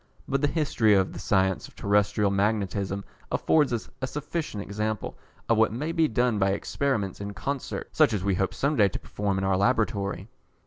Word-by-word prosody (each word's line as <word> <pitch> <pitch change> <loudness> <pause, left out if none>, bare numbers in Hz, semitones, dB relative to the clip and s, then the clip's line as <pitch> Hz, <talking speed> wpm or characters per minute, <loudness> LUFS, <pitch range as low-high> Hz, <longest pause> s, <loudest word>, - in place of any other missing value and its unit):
But 135 0 0
the 145 - +3
history 140 -9 +2
of 95 -1 +1
the - - -7
science 95 -2 +1
of - - -20
terrestrial 100 0 +2
magnetism 100 -1 0 0.3
affords 150 -4 +3
us 120 -2 -2
a 130 - -1
sufficient 150 -6 -4
example 105 +1 -3 0.3
of 115 -1 +3
what 110 - +4
may 145 +8 -3
be 165 -2 +3
done 120 -2 +1
by 95 0 +3
Experiments 105 -5 -2
in 100 0 -5
Concert, 140 +6 -4
such - - +4
as 105 -4 -1
we 100 -1 +1
hope 95 +1 -1
some 145 +2 +1
day 105 -6 +5
to - - -4
perform 100 -2 -2
in 95 - -1
our 95 -1 +2
Laboratory. 100 -3 0
105 Hz, 190 wpm, -27 LUFS, 100-130 Hz, 0.3 s, day